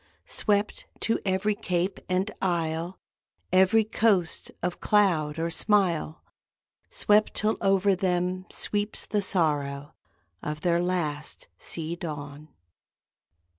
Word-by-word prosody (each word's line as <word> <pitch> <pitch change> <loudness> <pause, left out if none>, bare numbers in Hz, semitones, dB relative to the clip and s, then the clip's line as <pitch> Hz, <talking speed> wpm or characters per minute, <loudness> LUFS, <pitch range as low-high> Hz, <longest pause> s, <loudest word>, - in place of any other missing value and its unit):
Swept 210 - 0
to 225 - 0
every 190 +2 +1
cape 180 -1 -2
and 185 +3 0
isle 170 0 -1 0.5
(Every 190 +4 +5
coast 210 -5 +1
of 180 0 -2
cloud 170 -8 +2
or 165 +1 -1
smile), 175 -4 +1 0.7
Swept 210 +1 +2
till 215 +1 +1
over 195 0 +3
them 180 0 -1
sweeps 205 0 -1
the 210 -1 0
sorrow 145 -6 +1 0.5
Of 150 0 -5
their 170 0 +2
last 160 -5 -1
sea 165 0 -3
dawn. 150 -2 -7
180 Hz, 105 wpm, -27 LUFS, 160-200 Hz, 0.7 s, Every